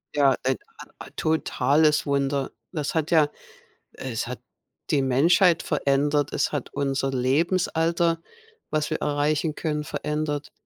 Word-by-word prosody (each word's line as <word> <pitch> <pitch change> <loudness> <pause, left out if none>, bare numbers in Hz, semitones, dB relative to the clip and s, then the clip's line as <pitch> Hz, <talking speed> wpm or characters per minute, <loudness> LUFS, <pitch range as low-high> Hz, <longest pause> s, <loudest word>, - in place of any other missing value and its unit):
Ja, 140 -2 +4
ein 130 0 +1 0.2
a - - -10 0.2
a - - -12
totales 155 -1 +2
Wunder. 140 -1 0 0.2
Das 150 0 -3
hat 160 +1 0
ja 155 -3 +5 0.6
es 120 -4 -4
hat 125 - -6 0.5
die 140 - +3
Menschheit 165 +7 +4
verändert. 145 +1 +1
Es - - 0
hat 145 - -4
unser 135 -1 -1
Lebensalter, 165 +4 +1 0.5
was 155 -1 -1
wir - - -2
erreichen 150 +1 0
können, 150 -1 -2
verändert. 150 -1 -3
145 Hz, 130 wpm, -25 LUFS, 135-155 Hz, 0.6 s, ja